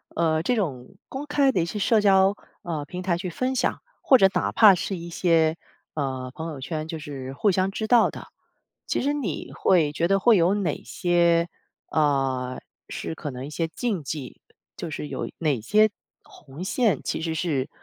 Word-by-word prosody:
呃， 160 Hz, -1 st, +2 dB
这 245 Hz, -, +1 dB
种 140 Hz, -, -3 dB
公 270 Hz, +2 st, -6 dB
开 285 Hz, -2 st, +3 dB
的 185 Hz, -, +1 dB
一 -, -, 0 dB
些 190 Hz, -, -5 dB
社 215 Hz, +2 st, +3 dB
交， 195 Hz, -1 st, +4 dB, 0.3 s
呃， 160 Hz, -4 st, -3 dB
平 180 Hz, +4 st, -6 dB
台 175 Hz, -2 st, +1 dB
去 180 Hz, +1 st, -4 dB
分 255 Hz, +9 st, -2 dB
享， -, -, 0 dB, 0.2 s
或 265 Hz, -, +6 dB
者 195 Hz, -5 st, +6 dB
哪 -, -, 0 dB
怕 210 Hz, -3 st, +7 dB
是 185 Hz, +2 st, -3 dB
一 170 Hz, 0 st, -8 dB
些， 165 Hz, -2 st, +2 dB, 0.4 s
呃， 130 Hz, -3 st, -3 dB
朋 160 Hz, +1 st, -5 dB
友 145 Hz, -, -7 dB
圈 155 Hz, +3 st, -4 dB
就 160 Hz, -, -5 dB
是 135 Hz, -3 st, -7 dB
互 200 Hz, +9 st, +2 dB
相 185 Hz, +1 st, +1 dB
知 215 Hz, +3 st, -3 dB
道 240 Hz, -1 st, +5 dB
的， -, -, -10 dB, 0.6 s
其 -, -, 0 dB
实 285 Hz, +2 st, +1 dB
你 245 Hz, -, -4 dB
会 165 Hz, -6 st, +2 dB
觉 165 Hz, +3 st, +1 dB
得 195 Hz, +1 st, +3 dB
会 230 Hz, +3 st, +5 dB
有 175 Hz, +4 st, +3 dB
哪 185 Hz, -7 st, -2 dB
些， 170 Hz, -1 st, +2 dB, 0.4 s
呃， 135 Hz, -4 st, 0 dB, 0.3 s
是 -, -, -5 dB
可 150 Hz, -, -5 dB
能 125 Hz, +1 st, -7 dB
一 145 Hz, -, -7 dB
些 165 Hz, +2 st, -2 dB
禁 190 Hz, +1 st, -3 dB
忌？ 135 Hz, -1 st, -6 dB, 0.3 s
就 170 Hz, -, -6 dB
是 150 Hz, -1 st, -5 dB
有 -, -, -4 dB
哪 145 Hz, -8 st, 0 dB
些 215 Hz, -, +4 dB, 0.3 s
红 145 Hz, +4 st, -11 dB
线， 200 Hz, -, +1 dB
其 -, -, -2 dB
实 160 Hz, -1 st, -2 dB
是， 150 Hz, -5 st, -1 dB
170 Hz, 210 characters per minute, -25 LUFS, 150-195 Hz, 0.6 s, 怕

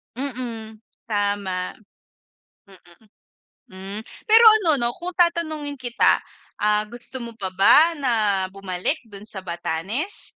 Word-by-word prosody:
Mm, 235 Hz, -5 st, -6 dB, 0.3 s
tama. 200 Hz, -3 st, -1 dB, 1.0 s
Mm. 175 Hz, -3 st, -19 dB, 0.7 s
Hmm. 195 Hz, +2 st, -7 dB, 0.3 s
Pero 450 Hz, +2 st, +7 dB, 0.2 s
ano 330 Hz, -5 st, +3 dB
'no, 235 Hz, -, +3 dB
kung 360 Hz, +1 st, -6 dB
tatanungin 315 Hz, -5 st, 0 dB
kita, 240 Hz, -2 st, +2 dB, 0.4 s
ah, 210 Hz, 0 st, +2 dB
gusto 240 Hz, +3 st, -8 dB
mo 235 Hz, -, -7 dB
pa 195 Hz, -4 st, -4 dB
ba 300 Hz, -, +5 dB
na 265 Hz, -3 st, +1 dB, 0.4 s
bumalik 195 Hz, -, -2 dB
do' 205 Hz, -, -12 dB
n -, -, -13 dB
sa 200 Hz, -, -5 dB
Batanes? 185 Hz, -, -4 dB
220 Hz, 120 wpm, -23 LUFS, 195-290 Hz, 1.0 s, Pero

